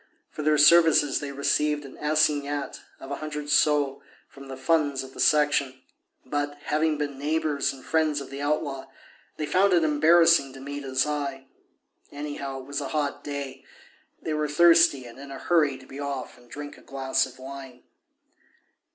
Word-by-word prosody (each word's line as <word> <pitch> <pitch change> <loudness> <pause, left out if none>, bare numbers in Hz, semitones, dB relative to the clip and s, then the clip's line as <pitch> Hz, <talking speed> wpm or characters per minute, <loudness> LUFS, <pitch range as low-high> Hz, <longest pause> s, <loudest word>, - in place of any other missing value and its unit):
For - - -6
their 150 0 +2
services 150 -2 +5
they 145 -1 -5
received 145 +1 0
an 135 - -11
assignat 150 -2 0 0.2
of 135 - -10
a 140 - -3
hundred 150 -1 -5
sols 145 -2 +2 0.3
from 140 0 -13
the 135 -1 -8
funds 145 -1 +1
of 130 0 -12
the - - -13
Section; 145 -3 +2 0.5
but, 145 +2 -3
having 155 0 0
been 145 -2 -4
neighbours 145 -2 0
and 135 -2 -13
friends 155 -2 +1
of 140 - -9
the 140 +1 -6
outlaw, 145 -2 -2 0.5
they 155 - -2
found 190 +5 +3
it 170 -2 +4
embarrassing 155 -1 +4
to 135 - -11
meet 145 +1 -6
his 130 -1 0
eye. 140 -3 -4 0.7
Anyhow, 145 -2 -6
it - - -13
was 140 +1 -4
a 140 - -4
hot 145 -1 -2
day; 140 -2 -6 0.6
they 155 - -4
were 150 0 -1
thirsty 165 -3 +5
and 120 +2 -12
in 140 0 -10
a 135 - -7
hurry 150 -5 +1
to 130 - -15
be 135 +2 -10
off 140 -2 -5
and 120 -1 -21
drink 145 +2 -9
a - - -18
glass 135 -1 -1
of 130 - -15
wine. 130 -1 -10
145 Hz, 175 wpm, -26 LUFS, 135-150 Hz, 0.7 s, services